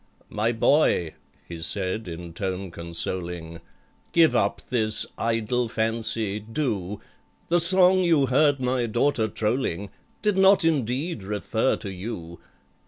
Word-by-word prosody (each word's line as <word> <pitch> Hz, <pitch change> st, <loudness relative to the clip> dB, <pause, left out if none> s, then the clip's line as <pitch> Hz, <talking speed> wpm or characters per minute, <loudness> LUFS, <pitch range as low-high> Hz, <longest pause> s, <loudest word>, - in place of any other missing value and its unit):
"My 110 Hz, +2 st, 0 dB
boy," 115 Hz, -, +2 dB, 0.3 s
he 85 Hz, -1 st, -8 dB
said, 95 Hz, +4 st, -1 dB
in 85 Hz, 0 st, -8 dB
tone 95 Hz, 0 st, -4 dB
consoling, 85 Hz, 0 st, -3 dB, 0.5 s
"Give 165 Hz, -2 st, +4 dB
up -, -, 0 dB
this 110 Hz, -3 st, +3 dB
idle 115 Hz, +1 st, -1 dB
fancy—do— 110 Hz, -1 st, -2 dB, 0.5 s
The 175 Hz, +1 st, +3 dB
song 185 Hz, +2 st, +7 dB
you 165 Hz, -6 st, +3 dB
heard 140 Hz, +2 st, +2 dB
my 125 Hz, -1 st, -1 dB
daughter 120 Hz, 0 st, 0 dB
trolling 105 Hz, -3 st, -3 dB, 0.3 s
Did 210 Hz, -3 st, +1 dB
not, 190 Hz, -2 st, +4 dB
indeed, 140 Hz, -, -1 dB
refer 105 Hz, +4 st, -1 dB
to 100 Hz, -, -8 dB
you. 90 Hz, -4 st, -8 dB
110 Hz, 115 wpm, -24 LUFS, 95-135 Hz, 0.5 s, song